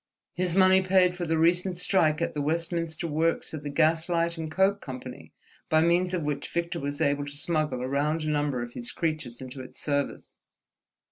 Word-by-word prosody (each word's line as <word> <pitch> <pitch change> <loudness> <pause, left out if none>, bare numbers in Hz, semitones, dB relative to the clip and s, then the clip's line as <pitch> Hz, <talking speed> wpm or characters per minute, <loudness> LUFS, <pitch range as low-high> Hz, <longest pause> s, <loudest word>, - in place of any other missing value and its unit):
His 180 -1 -1
money 190 0 +6
paid 185 -1 +4
for 175 -1 -4
the 160 0 +1
recent 175 +3 +2
strike 170 -3 +2
at - - -2
the 150 - -2
Westminster 165 +1 -2
works 165 +1 0
of 155 - -5
the 145 - -5
Gas 160 +3 +2
Light 170 -1 +1
and 160 -2 -5
Coke 195 +4 +2
Company, 130 -1 -8 0.4
by 160 0 +4
means 175 +2 +2
of 170 - -2
which 145 -1 -2
Victor 170 0 -2
was 145 +1 -4
able 145 0 +1
to 145 0 -8
smuggle 155 -5 -1
a - - -2
round 150 +4 0
number 145 -4 0
of 120 0 -8
his 120 0 -5
creatures 155 -6 -3
into 130 +1 -8
its 130 - -11
service. 145 -1 -3
160 Hz, 195 wpm, -27 LUFS, 145-170 Hz, 0.4 s, money